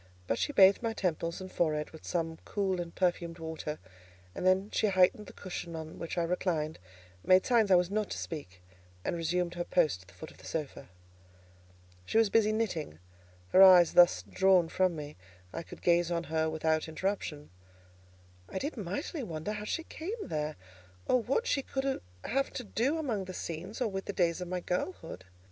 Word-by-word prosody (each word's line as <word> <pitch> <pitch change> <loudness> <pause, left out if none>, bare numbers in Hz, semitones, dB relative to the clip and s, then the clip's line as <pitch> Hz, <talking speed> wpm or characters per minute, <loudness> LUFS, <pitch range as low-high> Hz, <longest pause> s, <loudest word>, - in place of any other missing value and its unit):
But 115 - -1
she - - 0
bathed 195 -7 +6
my 230 -1 -1
temples 170 -4 -2
and 185 0 -8
forehead 155 -3 0
with 160 - -12
some 165 -2 -2
cool 190 -3 -1
and 170 -1 -8
perfumed 175 -2 0
water, 160 -2 -5 0.6
and 185 - -1
then 190 +2 +3
she 215 - +2
heightened 190 +2 +3
the - - -9
cushion 175 -3 -6
on 160 0 -7
which 165 - -5
I 170 - +2
reclined, 165 -3 -1 0.4
made 185 0 +5
signs 235 -4 +4
that 190 - +6
I - - +7
was 180 +1 +1
not 215 0 0
to - - -4
speak, 90 - -7 0.4
and - - 0
resumed 170 +1 -1
her 175 0 -2
post 160 - +1
at 90 - -19
the - - -18
foot 160 - -9
of - - -19
the - - -11
sofa. 145 -3 -5 1.1
She 95 - -1
was 225 -3 +4
busy 215 -1 +4
knitting; 190 - -2 0.5
her 190 - +6
eyes 180 -3 +8
thus 175 0 +6
drawn 185 -3 +4
from 185 -1 +1
me, 150 -5 -7 0.4
I - - -3
could - - -12
gaze 175 -1 +3
on 170 -1 -1
her 160 0 +2
without 160 0 0
interruption. 160 - -3 1.0
I - - -5
did 285 +7 -3
mightily 220 - -4
wonder 165 -3 -4
how 210 0 -5
she 330 +9 -2
came 365 +8 -6
there, 155 -1 -2 0.5
or 255 - +3
what 270 - 0
she 280 - +1
could 270 0 -2 0.3
have 275 +5 0
to 250 - -4
do 245 +8 0
among 235 -11 -2
the 185 0 -7
scenes, 175 +6 -6
or 250 - +1
with 195 -2 -4
the 200 - -4
days 175 -2 +1
of 180 - -4
my 180 0 -3
girlhood. 180 - -4
180 Hz, 195 wpm, -31 LUFS, 160-205 Hz, 1.1 s, eyes